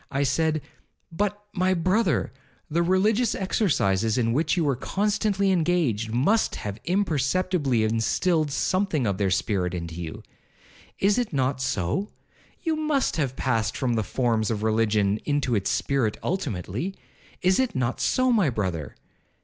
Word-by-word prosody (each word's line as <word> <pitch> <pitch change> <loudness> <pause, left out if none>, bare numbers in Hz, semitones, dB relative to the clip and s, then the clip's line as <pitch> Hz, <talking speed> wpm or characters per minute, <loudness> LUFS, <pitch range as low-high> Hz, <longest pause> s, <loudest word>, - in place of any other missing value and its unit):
I 140 +1 0
said, 155 +2 +1 0.5
'But, 205 +4 -1
my 185 0 +2
brother, 185 - +1 0.4
the 170 +3 +2
religious 205 +6 +2
exercises 115 - +1
in 115 -2 +1
which 155 +5 +1
you 170 - +2
were 140 -3 +1
constantly 200 - 0
engaged, 155 - +1
must 155 - +2
have 105 +1 -5
imperceptibly 165 - +1
instilled 145 +9 +1
something 165 -1 0
of 100 -2 -1
their 100 -2 +2
spirit 95 -1 0
into 85 -1 -5
you?—is 195 - -4
it 245 - -2
not 130 -1 0
so? 125 - -1 0.5
You 325 -3 +1
must 305 - 0
have 135 -5 -1
passed 115 -5 0
from 125 -3 0
the 115 - +1
forms 115 -1 0
of 110 -2 -2
religion 110 -2 +2
into 145 -4 0
its 100 -3 0
spirit 130 -6 0
ultimately?—is 175 - -3
it 260 -3 0
not 125 -1 -1
so, 255 -1 +2
my 205 - +3
brother? 90 - -3
140 Hz, 140 wpm, -25 LUFS, -, 0.5 s, my